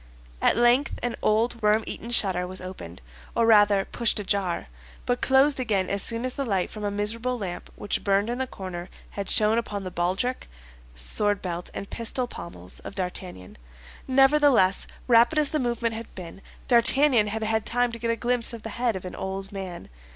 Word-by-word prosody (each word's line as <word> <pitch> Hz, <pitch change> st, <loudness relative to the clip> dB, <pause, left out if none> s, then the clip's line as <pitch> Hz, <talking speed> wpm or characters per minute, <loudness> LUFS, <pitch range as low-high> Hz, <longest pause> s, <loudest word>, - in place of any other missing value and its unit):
At -, -, +3 dB
length 240 Hz, +4 st, +3 dB
an 245 Hz, -1 st, -1 dB
old, 230 Hz, +2 st, +1 dB
worm 210 Hz, +1 st, +3 dB
eaten 235 Hz, -, -6 dB
shutter 190 Hz, -6 st, +3 dB
was 185 Hz, +1 st, -2 dB
opened, 90 Hz, -, -9 dB, 0.3 s
or 230 Hz, -, +3 dB
rather 205 Hz, -3 st, +5 dB
pushed 235 Hz, -2 st, -1 dB
ajar, 195 Hz, -3 st, -1 dB, 0.4 s
but 245 Hz, 0 st, -1 dB
closed 270 Hz, +1 st, +4 dB
again 205 Hz, -7 st, 0 dB
as 200 Hz, 0 st, +3 dB
soon 230 Hz, +1 st, 0 dB
as 255 Hz, -, -2 dB
the 280 Hz, -, -3 dB
light 195 Hz, -7 st, -1 dB
from 215 Hz, -, -7 dB
a 205 Hz, -, 0 dB
miserable 225 Hz, +5 st, -2 dB
lamp 185 Hz, -5 st, -6 dB
which 205 Hz, -, -3 dB
burned 200 Hz, +1 st, +2 dB
in 240 Hz, +2 st, -3 dB
the 260 Hz, -, -1 dB
corner 185 Hz, -4 st, -7 dB, 0.2 s
had 200 Hz, -2 st, -5 dB
shone 215 Hz, +2 st, +5 dB
upon 205 Hz, -3 st, -5 dB
the 185 Hz, -, -6 dB
baldric, 190 Hz, +10 st, -2 dB, 0.5 s
sword 205 Hz, -, +1 dB
belt, 175 Hz, -1 st, -5 dB
and 200 Hz, -, -7 dB
pistol 245 Hz, +2 st, -1 dB
pommels 90 Hz, -, -5 dB
of -, -, -9 dB
D'Artagnan. 180 Hz, -, -6 dB, 0.5 s
Nevertheless, 270 Hz, -7 st, +4 dB, 0.2 s
rapid 235 Hz, +4 st, +5 dB
as 300 Hz, -2 st, +2 dB
the 305 Hz, -, 0 dB
movement 235 Hz, -2 st, -1 dB
had 225 Hz, +1 st, -8 dB
been, 180 Hz, +1 st, -9 dB, 0.3 s
D'Artagnan 245 Hz, -1 st, +4 dB
had 220 Hz, +1 st, -3 dB
had 220 Hz, 0 st, 0 dB
time 245 Hz, 0 st, 0 dB
to 235 Hz, -, -7 dB
get 230 Hz, 0 st, -2 dB
a 230 Hz, -, +2 dB
glimpse 240 Hz, +1 st, -1 dB
of 230 Hz, -2 st, -8 dB
the 225 Hz, -, -5 dB
head 240 Hz, -4 st, +1 dB
of 185 Hz, -, -6 dB
an 180 Hz, -, -7 dB
old 195 Hz, 0 st, -5 dB
man. 190 Hz, -3 st, -7 dB
215 Hz, 190 wpm, -25 LUFS, 190-240 Hz, 0.5 s, rather